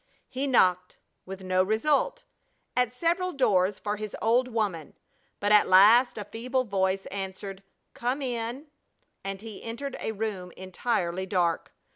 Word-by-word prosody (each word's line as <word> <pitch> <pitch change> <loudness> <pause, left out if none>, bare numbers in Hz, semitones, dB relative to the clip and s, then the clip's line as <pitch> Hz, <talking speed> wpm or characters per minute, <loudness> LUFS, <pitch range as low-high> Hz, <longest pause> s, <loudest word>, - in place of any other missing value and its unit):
He 270 +2 -2
knocked, 185 -8 +2 0.3
with 190 0 -8
no 185 0 +2
result, 280 - +1 0.5
at 250 -2 +2
several 345 +7 0
doors 200 - +2
for 210 0 -3
his 215 -1 -6
old 240 +3 +2
woman, 210 -10 -3 0.4
but 205 +1 0
at 210 -1 +6
last 215 +8 +6
a 210 - -5
feeble 250 +5 -2
voice 195 -3 0
answered: 195 0 -6 0.3
"Come 255 +4 -2
in," 240 +2 -3 0.6
and 195 0 -5
he 220 -2 -8
entered 255 +4 -5
a 220 - -3
room 200 -4 -4
entirely 185 -1 -2
dark. 175 -3 0
210 Hz, 140 wpm, -27 LUFS, 190-250 Hz, 0.6 s, at